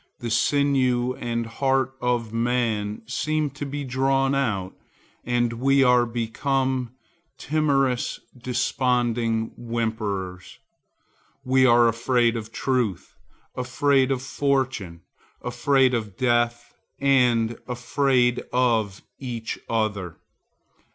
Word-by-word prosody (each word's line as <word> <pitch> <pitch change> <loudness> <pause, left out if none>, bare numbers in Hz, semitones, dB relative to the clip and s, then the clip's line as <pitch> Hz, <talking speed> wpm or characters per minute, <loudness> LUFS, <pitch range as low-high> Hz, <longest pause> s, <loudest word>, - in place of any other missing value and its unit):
The 120 -1 -5
sinew 130 -2 +2
and 115 -1 -2
heart 135 +2 0
of 120 -3 -1
man 115 -3 -1
seem 150 +4 -1
to 145 +1 -6
be 145 +1 -4
drawn 135 +1 +1
out, 110 -9 -1 0.5
and 120 -1 0
we 135 +3 +3
are 125 -1 +4
become 130 +2 -1 0.4
timorous, 135 -5 0 0.2
desponding 120 -2 0
whimperers. 110 -6 -4 0.9
We 130 0 +4
are 120 -1 +6
afraid 120 0 +2
of 110 -1 -6
truth, 120 -10 -1 0.4
afraid 130 +2 +2
of 130 -1 -1
fortune, 130 - -1 0.4
afraid 130 +1 +2
of 110 -5 -3
death 120 -1 0 0.3
and 120 -4 +2
afraid 125 0 +1
of 115 -6 +1 0.2
each 120 -4 -5
other. 105 -6 -2
120 Hz, 95 wpm, -24 LUFS, 115-135 Hz, 0.9 s, are